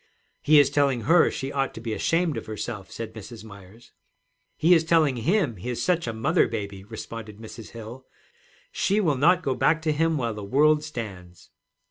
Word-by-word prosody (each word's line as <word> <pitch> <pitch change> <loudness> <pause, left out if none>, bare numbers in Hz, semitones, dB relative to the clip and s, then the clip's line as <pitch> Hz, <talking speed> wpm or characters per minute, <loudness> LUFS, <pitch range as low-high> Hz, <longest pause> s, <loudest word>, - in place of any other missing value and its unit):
'He 155 +1 +5
is 145 - +4
telling 140 -4 +1
her 165 +7 +4
she 135 +1 -5
ought 135 -1 -2
to - - -7
be 115 -1 -4
ashamed 165 +4 0
of 115 - -6
herself,' 110 -2 -6
said 115 -1 -7
Mrs. 110 +1 -10
Myers. 100 +2 -14 0.7
'He 170 +3 +5
is 165 -2 +4
telling 160 -4 +3
him 145 - 0
he 100 +8 -6
is 120 -1 -3
such 175 -1 0
a - - -1
mother 140 +10 +1
baby,' 100 -3 -6
responded 110 0 -8
Mrs. 110 0 -11
Hill. 115 +3 -10 0.6
'She 200 +2 +1
will 160 -9 +1
not 175 +7 +3
go 135 -3 0
back 160 +5 +2
to 155 - +1
him 165 +1 +1
while 120 -4 -2
the 105 -1 -7
world 150 +8 +3
stands.' 100 - -8
125 Hz, 190 wpm, -25 LUFS, 110-155 Hz, 0.7 s, He